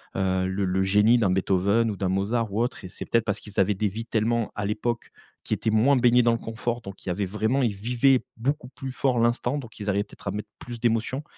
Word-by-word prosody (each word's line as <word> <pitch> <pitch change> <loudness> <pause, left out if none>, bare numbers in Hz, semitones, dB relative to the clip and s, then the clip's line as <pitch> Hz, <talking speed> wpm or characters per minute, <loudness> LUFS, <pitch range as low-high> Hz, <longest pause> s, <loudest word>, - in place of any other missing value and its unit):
heu, 95 -1 +1
le 95 +2 -1
le 95 +1 +1
génie 105 +5 +4
d'un 100 -5 +2
Beethoven 100 +4 +2
ou 100 - -6
d'un 95 - -1
Mozart 105 +4 0
ou 110 - +1
autre 120 -4 -2
et - - -7
c'est - - -8
peut-être 115 -1 +1
parce 105 - -1
qu'ils 105 - -6
avaient 95 +2 +3
des 105 +3 0
vies 110 +4 -6
tellement, 115 0 0
à 105 - -2
l'époque, 110 +3 -2 0.3
qui - - -2
étaient - - 0
moins 115 +6 +4
baignées 125 -1 +5
dans 120 - +4
le 115 - -1
confort, 120 +2 -3
donc, 100 -3 -10
il - - -3
y - - +1
avait 100 +3 -1
vraiment 110 +7 0
ils 115 -4 +1
vivaient 125 +5 +2
beaucoup 125 +2 -2
plus 135 0 -7
fort 130 -1 +1
l'instant, 120 +3 +1
donc 115 -5 -11
ils 105 0 -3
arrivaient, 100 0 +1
peut-être, - - -14
à - - -2
mettre 105 +1 -5
plus 120 -1 -8
d'émotion, 120 +4 0
110 Hz, 255 wpm, -25 LUFS, 100-120 Hz, 0.3 s, baignées